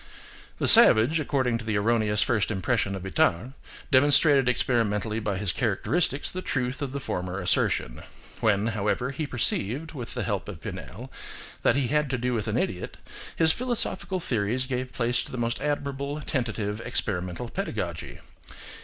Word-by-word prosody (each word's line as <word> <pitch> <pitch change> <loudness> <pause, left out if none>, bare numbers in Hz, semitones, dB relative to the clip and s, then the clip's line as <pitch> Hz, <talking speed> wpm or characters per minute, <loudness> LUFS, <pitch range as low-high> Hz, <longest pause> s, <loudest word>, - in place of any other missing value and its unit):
The - - 0
savage, 125 +10 +8
according 130 -5 0
to 115 - -8
the 110 -2 -1
erroneous 105 -1 +2
first 110 -5 0
impression 100 0 -1
of 95 - -7
Itard, 95 +5 0 0.4
demonstrated 140 0 +5
experimentally 110 -3 0
by 105 -3 -3
his 95 -2 -1
characteristics 125 - -1
the 185 - -5
truth 130 -3 -3
of 140 -2 -3
the 140 - -4
former 90 -7 -4
assertion. 90 -9 0 0.4
When, 105 -2 +1
however, 105 +5 -1
he 145 +2 -4
perceived, 125 +4 -1
with 125 -6 -8
the - - -2
help - - -3
of - - -8
Pinel, 125 +7 -8 0.5
that - - +3
he 135 -4 0
had 150 -1 +1
to 130 - -1
do 125 +1 -2
with 115 -1 -2
an 110 +2 -1
idiot, 90 -7 -3 0.4
his 160 -1 +4
philosophical 235 -6 -2
theories 120 - -1
gave 130 -1 -4
place 120 -1 0
to - - -11
the 130 - -6
most 120 +1 -2
admirable, 140 0 -3
tentative, 110 -6 -3
experimental 90 +3 -3
pedagogy. - - -5
120 Hz, 160 wpm, -26 LUFS, 105-140 Hz, 0.5 s, savage